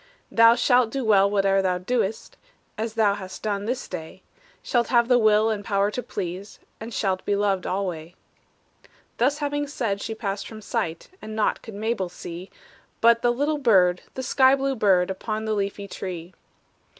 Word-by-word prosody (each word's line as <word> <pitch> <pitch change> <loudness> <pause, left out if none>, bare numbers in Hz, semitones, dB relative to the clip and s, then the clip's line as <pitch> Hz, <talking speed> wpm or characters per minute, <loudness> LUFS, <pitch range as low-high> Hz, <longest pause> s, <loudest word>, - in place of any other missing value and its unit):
"Thou 230 0 +6
shalt 245 -1 +3
do 265 +1 -3
well 200 -2 +5
whate'er 195 -1 +2
thou 185 -1 0
dost, 220 +2 -2 0.4
As 220 0 -4
thou 215 -3 +3
hast 190 -2 -8
done 205 -1 -2
this 250 +3 -3
day; 160 -3 -8 0.4
Shalt 240 -2 +1
have 235 -2 +3
the 245 -1 +4
will 215 0 +4
and 205 -2 -3
power 200 0 +1
to 250 - -3
please, 190 -2 -6 0.2
And 225 +2 -7
shalt 190 -4 -1
be 205 - 0
loved 200 -2 0
alway." 180 -3 -3 1.0
Thus 270 +5 +2
having 290 -1 -2
said, 225 -8 -2
she 225 - -4
passed 200 -3 -4
from 220 - -9
sight, 200 -8 -3
And 215 0 -7
naught 215 - 0
could 220 - -10
Mabel 215 -3 -2
see, 175 +1 -9 0.5
But 230 0 +5
the 240 - +3
little 290 +5 0
bird, 185 -8 +4
the 260 - -4
sky 260 +1 +4
blue 275 0 -1
bird, 190 -5 +3
Upon 215 +3 -4
the 220 - 0
leafy 200 0 -3
tree. 180 -2 -7
210 Hz, 175 wpm, -24 LUFS, 195-235 Hz, 1.0 s, Thou